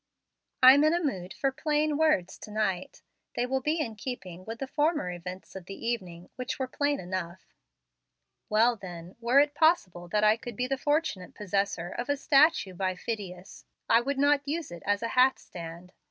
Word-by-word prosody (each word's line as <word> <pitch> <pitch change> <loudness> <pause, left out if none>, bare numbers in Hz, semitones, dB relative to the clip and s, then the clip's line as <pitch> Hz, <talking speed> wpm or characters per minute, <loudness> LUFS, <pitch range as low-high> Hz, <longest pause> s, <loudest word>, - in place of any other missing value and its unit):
"I'm 265 +3 +9
in 310 +2 +4
a 345 - -1
mood 190 - -3
for 275 - -1
plain 300 +2 0
words 295 - +1
to - - -10
night. 200 -4 -2 0.3
They 245 - 0
will 265 +1 -1
be 305 +5 0
in 230 -8 -3
keeping 185 -7 -7
with 225 +1 -6
the 270 - -4
former 295 - 0
events 180 +2 -8
of 185 -2 -8
the 195 - -7
evening, 185 -8 -4
which 255 +1 -4
were 265 - -1
plain 285 +2 -1
enough." 180 0 -6 1.0
"Well, 230 +3 +4
then, 180 -3 -9
were 240 +4 +4
it 290 0 +3
possible 290 - +2
that 210 +4 0
I 215 +1 +5
could 240 0 -8
be 250 - -1
the 270 +2 0
fortunate 290 - -1
possessor 195 -3 -1
of 245 +3 -5
a 285 - +1
statue 280 - +4
by 185 +1 -1
Phidias, 190 -3 -6 0.2
I 230 - +5
would 275 +3 -2
not 285 0 +3
use 315 +1 -3
it 170 -1 -8
as 205 +2 +1
a 230 - -1
hat 255 +1 +4
stand. 170 +1 -10
230 Hz, 190 wpm, -28 LUFS, 185-280 Hz, 1.0 s, I'm